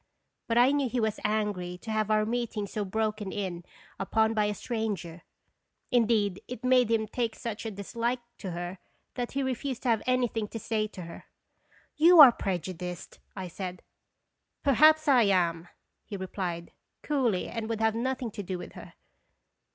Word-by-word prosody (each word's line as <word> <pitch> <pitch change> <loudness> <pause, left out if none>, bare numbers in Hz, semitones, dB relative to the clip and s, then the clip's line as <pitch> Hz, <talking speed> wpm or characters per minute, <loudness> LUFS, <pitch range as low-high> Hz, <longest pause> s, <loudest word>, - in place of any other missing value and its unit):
But 230 - +1
I 245 +3 +6
knew 285 -3 +1
he 250 - -1
was 220 -2 0
angry 205 -4 -1
to 220 +5 -7
have 215 -1 0
our 215 0 +3
meeting 230 -2 -2
so 210 +1 -3
broken 215 0 -2
in 185 -4 -4 0.4
upon 220 +3 +2
by 215 -1 +2
a 210 0 -1
stranger. 200 -9 -4 0.7
Indeed, 220 -5 +2
it 250 -1 -7
made 255 -2 +4
him 220 -1 +1
take 230 0 -2
such 230 -2 -5
a - - -2
dislike 230 +4 -2 0.2
to 195 - -5
her 175 +2 -5 0.3
that 245 -1 -4
he 275 0 0
refused 260 0 -3
to 255 - 0
have 225 -2 +3
anything 245 -4 +1
to 225 - -6
say 215 -1 -1
to 185 -4 -9
her. 170 0 -10 0.4
" - - -33
You 345 0 +8
are 275 -5 +12
prejudiced," 180 -3 -5
1 185 -3 -6
said. 180 0 -6 0.8
"Perhaps 310 +3 +5
1 255 -7 +5
am," 170 -3 +1 0.4
he 200 - -7
replied, 180 -3 -4 0.3
coolly, 250 -10 0
and 225 -1 -5
would 225 -1 -2
have 220 0 +3
nothing 250 0 -2
to 205 - -6
do 185 -1 -4
with 175 - -8
her. - - -12
220 Hz, 175 wpm, -28 LUFS, 190-240 Hz, 0.8 s, are